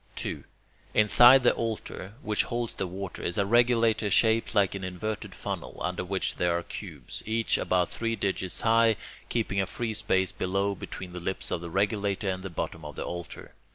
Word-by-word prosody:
2. - - -4 0.5
Inside 120 +5 +8
the 120 - +5
altar, 110 -3 -4
which 105 -1 +1
holds 120 -1 -3
the 95 - -3
water, 95 +1 -6
is 85 - -2
a 100 - +3
regulator 115 -1 +3
shaped 110 +3 +3
like 100 -2 +4
an 100 -1 -5
inverted 100 +4 -4
funnel, - - -5
under 90 0 -2
which 95 +1 -2
there 85 -1 +2
are 85 - -4
cubes, 80 -12 -7
each 115 +1 +1
about 90 -2 +2
three 115 0 -1
digits 95 -3 -2
high, 115 0 +4 0.3
keeping 105 -4 0
a 95 - -2
free 115 +2 -3
space 95 -3 +1
below 100 +2 -1
between 90 -1 -8
the 90 - -5
lips 95 +2 -2
of 85 - -1
the 85 - -6
regulator 100 +2 0
and 95 -1 -1
the 95 - -6
bottom 80 -1 -4
of 75 -1 -8
the - - -4
altar. 85 0 -7
100 Hz, 190 wpm, -28 LUFS, 90-110 Hz, 0.5 s, Inside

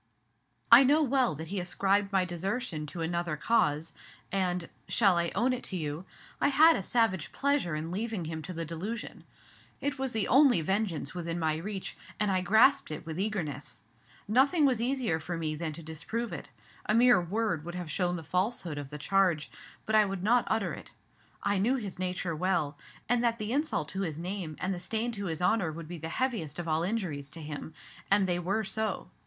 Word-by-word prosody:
"I 235 +4 +11
know 295 +4 +4
well 260 - +2
that 160 +2 -7
he 200 0 -2
ascribed 195 +3 +1
my 190 -2 +2
desertion 175 -1 -3
to 170 +2 -6
another 170 -1 -1
cause, 155 -5 +1 0.4
and 180 -3 0 0.2
shall 195 -5 +4
I 170 0 0
own 245 +6 +2
it 250 - -4
to 190 - -4
you? 155 +2 -4 0.4
I - - +4
had 315 +4 +6
a - - -1
savage 190 -5 +1
pleasure 280 - 0
in 160 +2 -4
leaving 210 -2 -2
him 160 0 -4
to 185 - -7
the 165 0 -3
delusion. 185 +9 -5 0.5
It 280 0 -2
was 265 -1 -1
the 220 -3 +1
only 265 - +6
vengeance 190 -1 -1
within 170 -1 -3
my 160 -2 0
reach, 195 +3 -5 0.2
and 210 -2 +3
I 185 -1 +2
grasped 225 +9 +4
it 155 +1 -6
with 160 +1 -5
eagerness. 150 - -3 0.4
Nothing 275 - +4
was 250 -5 +2
easier 245 -9 0
for 170 +2 -4
me 155 -2 -1
than 155 +1 -3
to 165 - -8
disprove 215 +9 -4
it, 145 - -7 0.4
a 215 - +3
mere 240 -5 +6
word 180 -2 -1
would 175 +1 -6
have 175 -3 -5
shown 180 +1 0
the 165 - -6
falsehood 180 -2 -1
of 140 -2 -7
the 150 - -6
charge; 175 0 +1 0.3
but 220 - -2
I 215 -1 +6
would 195 -2 -4
not 240 +3 +4
utter 220 -2 0
it. - - -9 0.5
I 205 -1 +1
knew 235 +7 +2
his 205 -8 -5
nature 180 -2 -2
well, 160 -4 0 0.3
and 245 0 +2
that 230 -1 +2
the 215 +1 -3
insult 290 - 0
to 195 - -4
his 160 -6 -3
name 175 -2 -4
and 190 +1 -1
the 180 - -5
stain 220 +6 -1
to 200 -3 -5
his 165 -2 -3
honor 185 -4 +2
would 165 0 -8
be 175 0 -7
the 160 +1 -5
heaviest 180 - -2
of 175 -1 -4
all 160 0 +1
injuries 175 -8 -2
to 165 - -10
him; 150 +1 -7 0.3
and 200 0 +4
they 175 -1 +1
were 195 +5 0
so. 220 +1 -3
185 Hz, 205 wpm, -30 LUFS, 165-225 Hz, 0.5 s, I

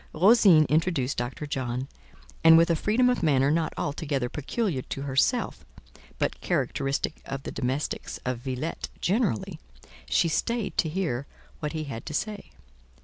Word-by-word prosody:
Rosine 185 -3 +6
introduced 155 -4 +1
Dr. 120 +5 -3
John, 130 -2 -3 0.6
and, 165 0 +9
with 170 +1 +4
a - - +3
freedom 220 +9 +2
of 250 0 +1
manner 140 -4 +3
not 160 0 +1
altogether 140 -4 -2
peculiar 150 - -2
to 135 - -6
herself, 135 -2 +1 0.5
but - - -2
characteristic 140 +2 -1
of 135 0 -6
the - - -5
domestics 130 +3 -3
of 125 -2 -1
Villette 130 +5 -4
generally, 195 - 0 0.5
she - - +3
stayed 230 +6 -1
to 160 - +2
hear 155 -7 -2 0.3
what 150 +1 -3
he 155 -1 -3
had 125 -6 -7
to 155 - -4
say. 210 +4 -3
150 Hz, 145 wpm, -27 LUFS, 135-170 Hz, 0.6 s, and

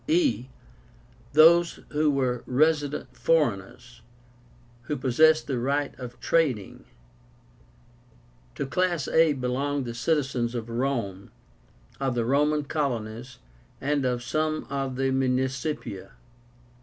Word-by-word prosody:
e. 305 - +2 0.9
Those 170 +3 +5
who 150 0 +1
were 130 -4 0
RESIDENT 145 0 +1
FOREIGNERS, 120 - -1 0.9
who 150 - -1
possessed 155 +5 +4
the 130 -4 -2
right 140 +3 -1
of 125 -1 -8
trading. 135 - 0 1.7
To - - -3
class 175 +1 0
a 160 -2 +4
belonged 135 +2 -2
the 120 - -5
citizens 125 -2 -1
of 115 -1 -4
Rome, 115 -6 -2 0.7
of 135 -3 -1
the 120 -1 0
Roman 150 +4 +2
colonies, 125 -4 -3 0.4
and 145 0 0
of 125 -1 -1
some 155 +4 -1
of 135 -2 -2
the 135 +1 0
Municipia. 130 -4 -2
135 Hz, 105 wpm, -26 LUFS, 125-150 Hz, 1.7 s, Those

